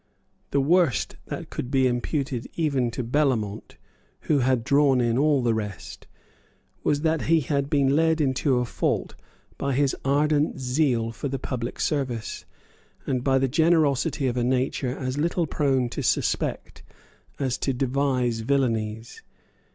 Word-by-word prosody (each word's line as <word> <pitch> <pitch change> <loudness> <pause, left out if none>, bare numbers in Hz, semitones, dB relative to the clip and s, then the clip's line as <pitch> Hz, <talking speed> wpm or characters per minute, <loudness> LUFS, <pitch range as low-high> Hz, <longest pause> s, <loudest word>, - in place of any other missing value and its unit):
The 140 - +1
worst 160 -5 +2
that - - -6
could 125 - -4
be 135 -1 +2
imputed 125 0 -1
even 140 -7 0
to 125 +2 -4
Bellamont, 120 -5 -1 0.4
who 150 - +1
had 130 -2 +1
drawn 140 0 +3
in 120 -1 +1
all 145 0 +2
the 120 -1 +2
rest, 105 -4 -6 0.8
was 145 -1 +1
that 160 -1 +1
he 165 -1 +5
had 140 0 -1
been 140 -2 +2
led 160 +1 +2
into 135 -2 +1
a 125 - +1
fault - - -1 0.5
by 140 0 -1
his 140 +1 +1
ardent 145 +2 +1
zeal 125 -3 +1
for 115 +5 -5
the 135 0 -3
public 125 -2 -5
service, 130 -7 -2 0.6
and 130 -2 -1
by 135 -1 +3
the 135 0 +2
generosity 155 -1 +2
of 125 -1 0
a 120 - +1
nature 130 +1 -1
as 130 +1 -3
little 170 +2 +1
prone 135 -4 +1
to - - -4
suspect - - -1 0.6
as 130 -3 -1
to 135 - 0
devise 130 -2 0
villanies. 115 -3 -1
135 Hz, 150 wpm, -25 LUFS, 125-145 Hz, 0.8 s, he